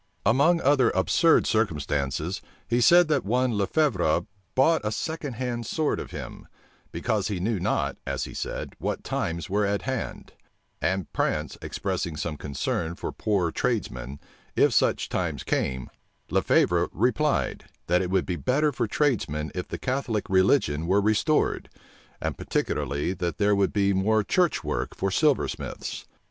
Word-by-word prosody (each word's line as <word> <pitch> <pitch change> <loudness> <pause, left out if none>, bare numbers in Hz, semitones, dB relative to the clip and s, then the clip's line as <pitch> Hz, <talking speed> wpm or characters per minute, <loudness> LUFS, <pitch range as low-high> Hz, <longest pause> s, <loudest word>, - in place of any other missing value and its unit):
Among 150 +9 +4
other 135 -3 +4
absurd 160 - +4
circumstances, 75 -5 -1 0.3
he 120 +2 +1
said 175 +6 +7
that 145 -4 +2
one 125 +3 +1
Le 100 -2 +1
Fevre 95 - +2 0.3
bought 160 +5 +4
a 105 - -1
second 160 +2 -3
hand 120 -1 -3
sword 155 -2 0
of - - -6
him; - - -8 0.4
because 105 +4 -1
he 100 -3 -2
knew 105 +2 0
not, 90 - 0
as - - -2
he - - -6
said, - - -4
what - - -3
times 85 0 -2
were 100 +2 +1
at 100 0 0
hand; 130 -2 -4 0.5
and 95 -3 -1
Prance 75 0 -1
expressing 80 -3 -3
some 75 +1 -3
concern 75 +3 -3
for - - -5
poor 95 -6 0
tradesmen, 70 - -2 0.4
if - - +4
such - - +2
times - - -2
came, 65 -1 -1 0.4
Le - - +3
Fevre 85 0 +3
replied, 140 +7 0 0.2
that 90 +2 +2
it 90 - -2
would 95 -1 +1
be 90 - -2
better 150 - +1
for 120 -3 -1
tradesmen 95 - 0
if 90 - -4
the - - -5
Catholic 130 -5 -2
religion 95 - +3
were 95 +3 +4
restored; 110 +9 +1 0.5
and - - -2
particularly, 70 +6 -1
that 85 -3 -3
there 105 0 +3
would 100 -1 +2
be 100 -1 +2
more 105 +3 +2
church 170 - +1
work 75 - -3
for 95 0 -1
silversmiths. 150 +6 -1
100 Hz, 155 wpm, -26 LUFS, 85-130 Hz, 0.5 s, said